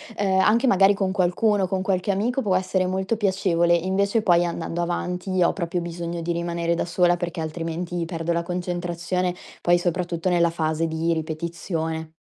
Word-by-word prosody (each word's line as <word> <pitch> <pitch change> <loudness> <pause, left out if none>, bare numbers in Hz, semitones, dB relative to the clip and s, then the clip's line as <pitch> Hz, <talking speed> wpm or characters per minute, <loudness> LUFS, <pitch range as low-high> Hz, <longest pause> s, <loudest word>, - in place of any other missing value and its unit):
ehm, 195 -2 +1
anche 230 +6 +4
magari 195 -4 +5
con 195 -1 0
qualcuno, 195 +2 +2
con 185 0 -1
qualche 190 0 -1
amico 225 +7 +1
può 200 -6 +1
essere 185 0 +1
molto 190 +4 -1
piacevole. 185 -4 +2
Invece 200 +5 +1
poi 175 -1 +4
andando 170 0 -3
avanti 180 +1 -1
ho - - +3
proprio 175 -1 -2
bisogno 170 0 -4
di 175 - -1
rimanere 170 0 -1
da 170 - -1
sola 175 0 +2
perché 175 0 -4
altrimenti 165 +2 -3
perdo 165 0 -2
la 170 - 0
concentrazione, 175 0 -2 0.3
poi 175 0 +4
soprattutto 175 0 -1
nella 170 -1 +3
fase 160 0 -1
di 160 +1 0
ripetizione. 160 0 -4
175 Hz, 165 wpm, -24 LUFS, 170-190 Hz, 0.3 s, magari